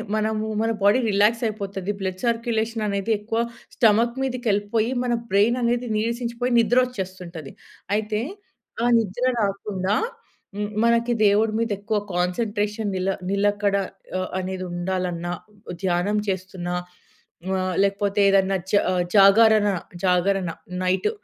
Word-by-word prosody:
మనము 215 0 -1
మన 225 - +1
body 205 +6 +5
relax 210 +4 +3
అయిపోతది. 200 -2 -4
బ్లడ్ 185 -1 -3
సర్క్యులేషన్ 230 -1 -1
అనేది 200 +2 -1
ఎక్కువ 225 +2 -2 0.4
స్టమక్ 235 +3 +3
మీదకెళ్ళిపోయి, 225 -2 0
మన 240 -1 0 0.2
బ్రెయిన్ 215 +5 +3
అనేది 240 +1 0
నీరసించిపోయి 235 +2 -1
నిద్రొచ్చేస్తుంటది. 190 - -1 0.4
అయితే, 215 0 -1 0.6
ఆ - - +3
నిద్ర 225 +3 -2 0.2
రాకుండా, 200 0 -1 0.6
హ్మ్. 205 0 -2 0.2
మనకి 235 +1 +3
దేవుడి 215 +2 +3
మీదెక్కువ 210 -1 -1
కాన్సన్‌ట్రేషన్ 205 +3 -1
నిల 185 +1 -1 0.2
నిలకడ 205 0 +1 0.4
ఆహ్, 185 - -3
అనేదుండాలన్నా 180 -1 -3 0.5
ధ్యానం 185 +4 +1
చేస్తున్నా 185 -1 -3 0.8
ఆహ్, 185 -1 -1
లేకపోతేదన్నా 200 -1 +2 0.2
జ - - +3 0.4
జాగరణ, 210 +2 +6 0.4
జాగరణ 180 0 +2 0.3
నైట్ 185 - +1
205 Hz, 105 wpm, -23 LUFS, 190-225 Hz, 0.8 s, జాగరణ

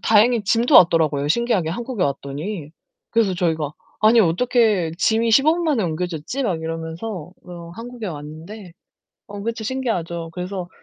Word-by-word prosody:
다행히 225 +1 +4
짐도 235 +7 +2
왔더라고요 155 -4 +5
신기하게 195 -4 +1
한국에 235 0 -3
왔더니. 145 +5 -4 0.4
그래서 225 -5 +2
저희가 160 -4 -1 0.3
"아니 225 +2 +6
어떻게 205 -1 +2
짐이 225 +3 +2
15 275 +7 +5
분 345 0 -2
만에 285 -8 +1
옮겨졌지?" 175 - -3
막 175 -7 -1
이러면서 165 +2 -5
어 175 -2 -9
한국에 235 +1 -7
왔는데 165 +5 -8 0.6
어 205 0 -7
그쵸 230 -1 -3
신기하죠. 175 -10 -3
그래서 180 0 -5
185 Hz, 345 characters per minute, -21 LUFS, 165-230 Hz, 0.6 s, 아니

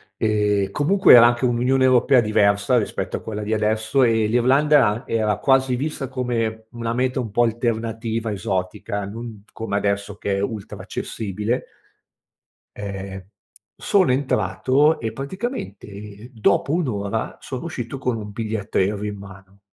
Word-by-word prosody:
e 105 -2 +1
comunque 175 - +5
era 115 - +9
anche 120 +1 +2
un'Unione 125 +2 +2
europea 130 0 +5
diversa 105 +2 +2
rispetto 110 - -2
a - - -10
quella 105 -1 -5
di 105 +1 -4
adesso 110 +4 +1
e 110 -2 +3
l'Irlanda 135 +3 +4
a 110 +5 -2
era 105 -3 0
quasi 130 +1 +2
vista 140 0 -3
come 115 -4 -2
una 115 -1 -3
meta 130 +1 0
un 115 -5 -4
po' 120 - +2
alternativa, 115 -1 -2
esotica, 100 +2 -3
non 110 0 -8
come 110 -3 -4
adesso 100 0 -1
che 100 -1 -2
è - - -1
ultra 105 0 -5
accessibile. 105 +3 -3 1.1
Ehm, 95 -2 -6 0.5
sono 185 -10 +2
entrato 130 - +2
e 110 -1 -4
praticamente 110 - -6
dopo 115 +6 +1
1 170 -5 0
ora 100 +1 -3
sono 130 +1 -6
uscito 130 -5 -5
con 125 -3 -1
un 105 -1 -7
biglietto 110 -2 -3
aereo 100 +2 +1
in 105 -1 -4
mano. 100 0 -13
110 Hz, 145 wpm, -22 LUFS, 105-125 Hz, 1.1 s, era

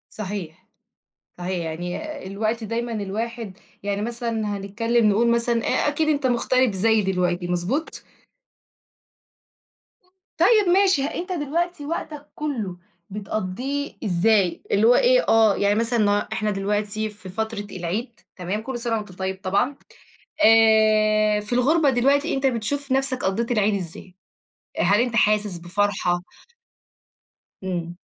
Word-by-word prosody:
صحيح. 190 -6 -6 0.7
صحيح. 180 -1 -3
يعني 175 - -5
الوقت 215 +4 -2
دايمًا 235 +2 -3
الواحد 220 0 -4 0.2
يعني 200 0 -2
مثلًا 225 -3 -2
هنتكلم 225 +3 +1
نقول 225 +3 +3
مثلًا 235 0 +1
أ - - +1
أكيد 305 +1 0
أنت 290 -3 +1
مُغترب 255 0 +2
زيي 215 +3 +3
دلوقتي، 180 -2 -1
مضبوط؟ 180 - -2 2.4
طيب 425 -5 +4
ماشي، 380 -7 +3
أنت 355 +5 -4
دلوقتي 335 0 -2
وقتك 300 -1 -5
كله 230 -12 -4 0.3
بتقضيه 215 +8 -4
إزاي؟ 190 0 +2
اللي 210 +3 +4
هو 245 - +6
إيه - - +4
آه. 220 -3 +5
يعني 205 0 +2
مثلًا 230 +2 +1
ن 210 -1 +3 0.2
إحنا 210 +2 -1
دلوقتي 210 +2 -1
في 195 -3 -11
فترة 220 +1 -4
العيد، 200 +7 -4 0.2
تمام، 185 +4 -3
كل 245 +1 -5
سنة 235 -1 -1
وأنت 210 -3 -7
طيب 190 +1 -4
طبعًا. 200 +9 0 0.7
آآ، 215 -1 +4
في 210 +2 -7
الغربة 285 +5 +3
دلوقتي 280 +6 +2
أنت 270 0 0
بتشوف 265 +3 -1
نفْسك 265 -1 0
قضيت 225 +5 -1
العيد 210 -2 +2
إزاي؟ 180 -1 -5 0.6
هل 200 +4 +3
أنت 240 -1 0
حاسس 210 -4 +2
بفرحة؟ 180 0 0 1.4
إمم. 175 -2 -4
220 Hz, 125 wpm, -23 LUFS, 195-250 Hz, 2.4 s, هو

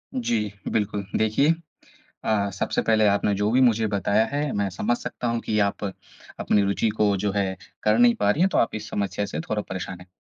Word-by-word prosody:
जी, 115 - -1 0.2
बिल्कुल 105 -2 -1
देखिए, 110 +7 +2 0.7
अ, 100 -2 +1
सबसे 100 - -1
पहले 110 -1 +3
आपने 100 0 +2
जो 105 +1 0
भी 130 +2 +4
मुझे 115 -3 +3
बताया 100 +1 +2
है 145 0 -1
मैं 100 -1 0
समझ 105 +6 -1
सकता 120 - -5
हूँ 115 0 0
कि 105 - -1
आप 100 - -4 0.6
अपनी 105 - +2
रुचि 100 +3 +1
को 105 -1 +3
जो 100 +1 -1
है 95 -2 0 0.3
कर 105 +1 +3
नहीं 120 0 +5
पा 100 - +1
रही 155 - -1
हैं, 190 - +4
तो - - 0
आप 115 - +2
इस 110 - -6
समस्या 100 0 -2
से 75 - -5
थोड़ा 105 +6 -2
परेशान 95 -1 -5
हैं। 90 - -14
105 Hz, 210 wpm, -24 LUFS, 100-115 Hz, 0.7 s, नहीं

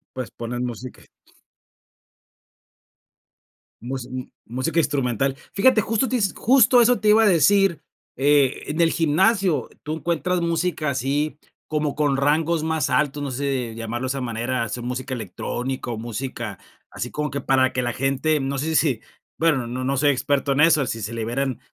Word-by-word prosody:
Pues 130 -2 -5
poner 120 +1 -5
música. 125 0 -6 2.8
Mus 125 +1 -5
m 130 0 -7 0.2
música 130 +8 -2
instrumental. 135 -3 0 0.2
Fíjate, 220 +3 +4
justo 225 +5 0
te 255 - 0
is 200 -5 +1
justo 245 0 +5
eso 245 +1 +4
te 215 - +1
iba 220 +1 +6
a - - +5
decir. 195 -1 +4 0.4
Eh, 140 0 +2
en 155 +3 -2
el 165 - +4
gimnasio 185 +3 +2
tú 155 +1 -3
encuentras 170 +3 -1
música 165 -2 0
así 140 +3 -1 0.3
como 150 -2 -1
con 145 -2 +1
rangos 155 +3 +1
más 160 -3 0
altos, 145 +2 +1
no 140 - -3
sé, 130 -3 -2
llamarlo 115 +2 -4
de - - -3
esa 135 +1 -2
manera 120 0 -2
sea 120 +3 -5
música 130 +2 -4
electrónica 120 +5 -4
o 115 - -3
música, 115 -2 -5 0.3
así 125 - -5
como 150 -1 -3
que 140 - -3
para 130 -1 +2
que 130 - -1
la 120 -1 -2
gente 135 +4 +1
no 135 0 -2
sé 160 +3 0
si 140 -9 +2 0.4
bueno, 150 -7 +2
no 125 +2 -4
no 135 +1 0
soy 145 +2 +3
experto 140 +1 0
en 135 - +1
eso, 150 -2 +5
si 115 - -4
se 110 +3 -4
liberen 120 +3 -2
140 Hz, 170 wpm, -23 LUFS, 125-160 Hz, 2.8 s, iba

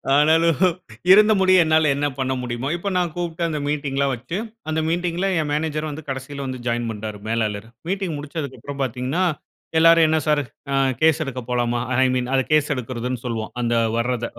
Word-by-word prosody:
ஆனாலும், 160 +1 +4 0.5
இருந்த 210 +2 +7
முடிய 185 -2 +5
என்னால 155 -1 +3
என்ன 145 +1 0
பண்ண 130 0 0
முடியுமோ, 120 +1 -3
இப்போ 175 +4 -3
நான் 175 -2 0
கூப்ட்டு 170 -1 -3
அந்த 155 -2 -2
மீட்டிங்லாம் 140 -2 0
வச்சு 130 +9 -5 0.3
அந்த 160 0 0
மீட்டிங்‌ல 175 +2 -1
என் 155 -2 -1
மேனேஜர் 155 0 -1
வந்து 150 +2 -7
கடசியில 135 +1 -5
வந் 130 -2 -5
ஜாயின் 120 0 -1
பண்ணிட்டாரு 105 -1 -5
மேலாளரு. 110 -2 -1 0.2
மீட்டிங் 190 -3 -2
முடிச்சதுக்கப்பறம் 145 -2 -6
பாத்தீங்கன்னா, 130 +7 -1 0.6
எல்லாரும் 165 0 +7
"என்ன 160 0 +2
சார்? 150 -1 +3 0.3
அ, - - 0 0.3
கேஸ் 160 0 +4
எடுக்க 130 -3 -5
போலாமா? 120 -1 0 0.2
ஐ - - +4
மீன் 125 -1 -1
அது 130 - +3
கேஸ் 155 -1 +3
எடுக்குறதுன்னு 125 0 -4
சொல்வோம். 115 -2 -3
அந்த 120 0 0 0.2
வர்றத 120 0 -1
145 Hz, 170 wpm, -22 LUFS, 125-160 Hz, 0.6 s, இருந்த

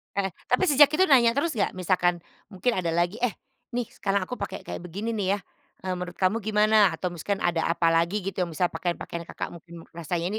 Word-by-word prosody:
Heeh, 195 -1 0 0.2
tapi 250 - +2
sejak 290 -5 +7
itu 370 - +4
nanya 235 -3 +6
terus 310 +4 +1
gak? 210 -8 -1
Misalkan, 175 -1 +1 0.2
mungkin 215 +5 -1
ada 175 - -2
lagi, 175 +6 0
eh, 245 -2 0 0.4
nih 245 - +1
sekarang 195 -1 -1
aku 250 +7 -6
pakai - - -5
kayak - - -6
begini 195 +6 -4
nih 200 -3 0
ya, 205 - -7 0.4
eee, 185 - -2
menurut 180 0 -6
kamu 190 +4 +1
gimana 210 -3 +4
atau 180 +2 -3
misalkan 195 +4 -3
ada 170 -2 +1
apalagi 170 +3 +2
gitu 195 +1 -4
yang 180 - +1
bisa 175 +2 0
pakaian-pakaian 170 -1 -4
Kakak - - -5
mungkin 170 0 -11
rasanya 170 +2 -3
185 Hz, 200 wpm, -26 LUFS, 175-215 Hz, 0.4 s, sejak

